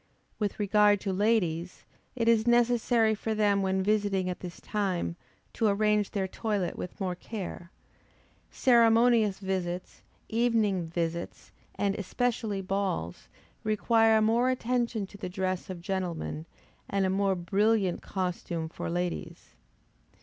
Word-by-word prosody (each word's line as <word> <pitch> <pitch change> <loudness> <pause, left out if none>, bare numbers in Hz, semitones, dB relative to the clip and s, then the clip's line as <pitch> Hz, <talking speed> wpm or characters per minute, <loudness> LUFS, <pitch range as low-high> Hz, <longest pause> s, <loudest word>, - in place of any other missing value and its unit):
With 210 -1 -2
regard 205 0 +4
to 195 - -2
ladies, 185 -5 0 0.3
it 230 -2 -1
is 230 0 +4
necessary 240 -1 +3
for 220 +1 -3
them 205 -2 +2
when 190 0 0
visiting 200 -3 +1
at 180 - -7
this 175 -2 -8
time, 190 -5 -2 0.4
to 225 - +1
arrange 210 0 +2
their 195 -2 -2
toilet 200 -3 -2
with 180 - -7
more 185 -2 -1
care. 180 -2 -7 0.8
Ceremonious 230 -3 +4
visits, 185 -2 -4 0.3
evening 220 -6 +1
visits, 170 0 -4 0.2
and 200 -1 0
especially 215 0 -2
balls, 185 - -2 0.4
require 220 +1 +3
more 235 +3 +3
attention 240 -3 -1
to 200 +1 -14
the 185 - -4
dress 185 0 -2
of 180 -2 -6
gentlemen, 175 -4 -3 0.4
and 195 -1 +1
a - - +1
more 195 0 +1
brilliant 195 +1 +1
costume 175 -3 -3
for - - -5
ladies. 175 0 -4
200 Hz, 130 wpm, -29 LUFS, 185-220 Hz, 0.8 s, regard